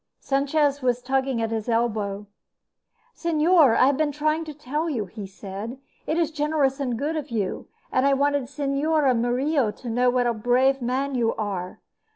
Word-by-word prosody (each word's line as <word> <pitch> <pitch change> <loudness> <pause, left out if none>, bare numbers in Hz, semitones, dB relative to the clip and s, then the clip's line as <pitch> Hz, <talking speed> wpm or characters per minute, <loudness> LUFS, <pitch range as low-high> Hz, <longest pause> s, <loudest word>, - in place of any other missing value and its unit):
Sanchez 285 +1 +1
was 250 -1 +1
tugging 265 -1 -1
at 225 - -2
his 225 +1 -3
elbow. 215 -3 -1 0.9
"Señor, 320 -4 +4
I - - +6
have 275 0 +2
been 305 -1 +1
trying 305 +2 0
to 310 - -6
tell 300 +3 -3
you," 235 -9 -2
he 200 +1 -8
said. 200 +5 -7 0.3
"It 315 - 0
is 330 -2 +1
generous 295 -3 0
and 250 -4 -1
good 295 +6 -2
of 300 -2 -4
you, 210 -5 -3 0.2
and 255 - +2
I 280 - +4
wanted 285 0 +1
Señora 280 +1 +1
Murillo 250 +2 +1
to 235 +4 -8
know 250 +2 +3
what 245 0 +1
a 240 - +2
brave 255 +4 +2
man 265 +3 -1
you 235 -3 +1
are. 195 -4 -4
265 Hz, 180 wpm, -24 LUFS, 230-290 Hz, 0.9 s, I